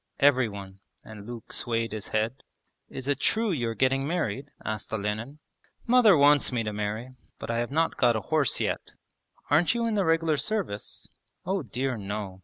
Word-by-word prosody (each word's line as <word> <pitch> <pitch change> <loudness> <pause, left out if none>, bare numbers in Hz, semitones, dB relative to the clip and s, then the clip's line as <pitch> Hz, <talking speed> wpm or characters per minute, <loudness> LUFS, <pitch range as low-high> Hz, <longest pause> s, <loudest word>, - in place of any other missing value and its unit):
'Every 130 -4 +4
one...' 100 -1 -9 0.2
and 105 -1 -11
Luke 120 -2 -8
swayed 115 -1 -1
his 110 -1 -5
head. 110 +4 -1 0.5
'Is 130 0 -7
it 140 -1 +1
true 220 +4 +1
you 120 -9 -1
are 115 - -4
getting 135 +2 +2
married?' 145 - -2 0.2
asked 110 -1 -4
Olenin. 110 +6 -3 0.5
'Mother 230 -7 +6
wants 145 0 +5
me 120 -2 0
to 105 -1 -3
marry. 105 +4 -3 0.3
But - - -5
I 115 - 0
have 120 - -1
not 160 +4 +1
got 120 -2 +4
a 110 - -1
horse 155 +2 +1
yet.' - - -2 0.6
'Aren't 160 +9 +4
you 235 0 0
in 225 - 0
the 205 -2 +2
regular 165 -2 +2
service?' 160 - -3 0.4
'Oh 190 +1 0
dear 130 0 -2
no! 100 -2 -5
125 Hz, 185 wpm, -27 LUFS, 110-155 Hz, 0.6 s, Mother